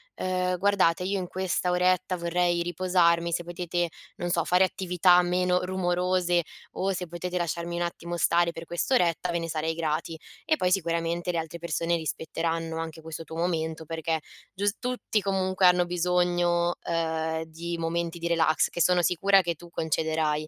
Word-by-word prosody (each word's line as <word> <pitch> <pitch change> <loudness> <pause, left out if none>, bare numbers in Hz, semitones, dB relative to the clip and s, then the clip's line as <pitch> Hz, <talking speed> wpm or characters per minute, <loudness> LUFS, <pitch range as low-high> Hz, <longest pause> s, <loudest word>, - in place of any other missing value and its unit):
"Ehm, 185 0 -1
guardate, 185 -3 +3
io 195 +2 -1
in 185 - -3
questa 185 -1 -1
oretta 185 +1 +2
vorrei 175 0 +1
riposarmi, 170 -1 +2
se 175 +1 -1
potete, 175 0 -2 0.3
non 175 - -3
so, 170 -1 +2
fare 180 +1 +4
attività 180 -1 +3
meno 180 0 +1
rumorose 180 -1 +1 0.3
o 195 +1 -1
se 180 -2 -3
potete 180 +2 -4
lasciarmi 170 0 -2
un - - -2
attimo 170 0 -4
stare 170 +1 +3
per 165 0 -8
quest'oretta, 175 -1 +1
ve 170 - 0
ne 165 0 -4
sarei 160 +1 -1
grati". 160 0 -2 0.3
E 315 - +3
poi 180 - +1
sicuramente 170 -1 0
le 170 - -2
altre 160 +1 -5
persone 170 0 -1
rispetteranno 165 +1 -3
anche 160 0 -6
questo 160 +1 -7
tuo 160 - -10
momento, 160 -2 -1
perché 160 0 -2 0.3
gius 205 +2 0
tutti, 250 -4 -1
comunque, 190 -1 +1
hanno 180 0 +5
bisogno, 175 0 +1
ehm, 160 -1 -1
di 170 +2 -5
momenti 170 +1 -2
di 170 - -2
relax 165 -2 +3
che 175 - -3
sono 180 +1 +4
sicura 195 +4 +4
che 170 -2 -2
tu 175 +2 -14
concederai. 155 -1 -1
175 Hz, 165 wpm, -27 LUFS, 165-180 Hz, 0.3 s, hanno